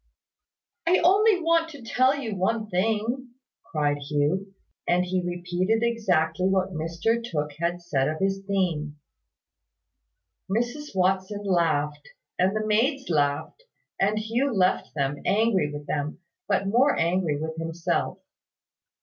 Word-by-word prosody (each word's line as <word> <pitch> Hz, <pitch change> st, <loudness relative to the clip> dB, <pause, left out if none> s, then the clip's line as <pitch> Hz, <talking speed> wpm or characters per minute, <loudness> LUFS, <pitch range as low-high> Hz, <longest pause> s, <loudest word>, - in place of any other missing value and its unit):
"I 360 Hz, +2 st, +5 dB
only 400 Hz, +3 st, +5 dB
want 330 Hz, 0 st, +3 dB
to 285 Hz, -6 st, -11 dB
tell 255 Hz, +4 st, +3 dB
you 225 Hz, -7 st, -4 dB
one 215 Hz, +3 st, -1 dB
thing," 225 Hz, +6 st, -1 dB, 0.3 s
cried 145 Hz, -2 st, -1 dB
Hugh; 150 Hz, +7 st, -1 dB, 0.3 s
and 180 Hz, +1 st, +3 dB
he 185 Hz, 0 st, 0 dB
repeated 180 Hz, +5 st, -1 dB
exactly 190 Hz, -7 st, +1 dB
what 190 Hz, 0 st, +1 dB
Mr 170 Hz, +9 st, -1 dB
Tooke 150 Hz, -10 st, -2 dB
had 175 Hz, +1 st, -1 dB
said 140 Hz, -6 st, 0 dB
of 155 Hz, -, -3 dB
his 195 Hz, +1 st, -1 dB
theme. 165 Hz, -7 st, -1 dB, 1.5 s
Mrs 240 Hz, +5 st, -2 dB
Watson 190 Hz, +2 st, +1 dB
laughed, 155 Hz, -6 st, 0 dB, 0.3 s
and 190 Hz, +3 st, +2 dB
the 215 Hz, 0 st, -1 dB
maids 245 Hz, -, +1 dB
laughed, 145 Hz, -, 0 dB, 0.4 s
and 205 Hz, +2 st, +2 dB
Hugh 230 Hz, +6 st, 0 dB
left 185 Hz, -4 st, +1 dB
them, 140 Hz, 0 st, -1 dB
angry 200 Hz, -7 st, +2 dB
with 145 Hz, 0 st, -7 dB
them, 145 Hz, 0 st, -2 dB, 0.3 s
but 200 Hz, -1 st, +1 dB
more 245 Hz, +8 st, +3 dB
angry 170 Hz, -3 st, +1 dB
with 160 Hz, +1 st, -4 dB
himself. 165 Hz, +1 st, -2 dB
190 Hz, 130 wpm, -26 LUFS, 160-225 Hz, 1.5 s, I